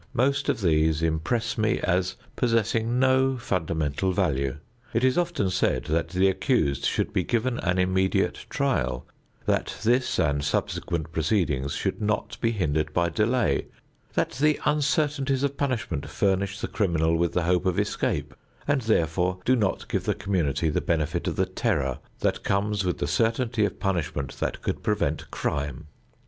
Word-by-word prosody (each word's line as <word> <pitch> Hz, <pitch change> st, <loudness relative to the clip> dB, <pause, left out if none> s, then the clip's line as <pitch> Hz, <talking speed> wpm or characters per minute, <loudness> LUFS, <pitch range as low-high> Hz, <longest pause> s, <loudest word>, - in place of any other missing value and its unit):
Most 135 Hz, +3 st, +2 dB
of -, -, 0 dB
these 80 Hz, -2 st, +2 dB
impress 85 Hz, +10 st, 0 dB
me 110 Hz, +2 st, +2 dB
as 95 Hz, +1 st, 0 dB, 0.2 s
possessing 115 Hz, 0 st, +1 dB
no 130 Hz, 0 st, +3 dB
fundamental 85 Hz, -, -1 dB
value. 70 Hz, -8 st, 0 dB, 0.4 s
It 115 Hz, -, +2 dB
is 130 Hz, 0 st, +4 dB
often 170 Hz, -, 0 dB
said 65 Hz, -8 st, +1 dB
that 80 Hz, +4 st, 0 dB
the 95 Hz, +1 st, +3 dB
accused 95 Hz, -, +1 dB
should -, -, 0 dB
be 90 Hz, -, +1 dB
given 120 Hz, +4 st, 0 dB
an 90 Hz, +1 st, 0 dB
immediate 95 Hz, +1 st, +1 dB
trial; -, -, 0 dB, 0.4 s
that -, -, 0 dB
this 120 Hz, +3 st, +2 dB
and 70 Hz, -4 st, +1 dB
subsequent 80 Hz, +2 st, -2 dB
proceedings 80 Hz, -5 st, 0 dB
should -, -, -2 dB
not 105 Hz, 0 st, -2 dB
be 115 Hz, -, +3 dB
hindered 80 Hz, -7 st, -1 dB
by 85 Hz, -1 st, +2 dB
delay; 115 Hz, +8 st, +1 dB, 0.5 s
that -, -, +1 dB
the 150 Hz, +3 st, +2 dB
uncertainties 145 Hz, -2 st, +1 dB
of 140 Hz, 0 st, 0 dB
punishment 130 Hz, -, -2 dB
furnish 100 Hz, +1 st, 0 dB
the -, -, -2 dB
criminal 85 Hz, -6 st, +1 dB
with 85 Hz, 0 st, +1 dB
the 90 Hz, -, +1 dB
hope 90 Hz, +2 st, +2 dB
of 90 Hz, -, +1 dB
escape 75 Hz, -1 st, -1 dB, 0.3 s
and 145 Hz, -2 st, +2 dB
therefore 90 Hz, -4 st, +1 dB
do 130 Hz, -, +4 dB
not 105 Hz, -6 st, -1 dB
give -, -, -2 dB
the -, -, +1 dB
community 80 Hz, -6 st, 0 dB
the -, -, 0 dB
benefit 80 Hz, -2 st, -1 dB
of -, -, -1 dB
the 95 Hz, -, +2 dB
terror 90 Hz, -, -1 dB, 0.2 s
that -, -, +1 dB
comes 100 Hz, +1 st, 0 dB
with 90 Hz, -2 st, -1 dB
the -, -, -1 dB
certainty 115 Hz, -, +1 dB
of -, -, -4 dB
punishment 80 Hz, -8 st, -2 dB
that -, -, -3 dB
could -, -, -2 dB
prevent -, -, -1 dB
crime. 70 Hz, +1 st, -3 dB
95 Hz, 160 wpm, -26 LUFS, 80-115 Hz, 0.5 s, is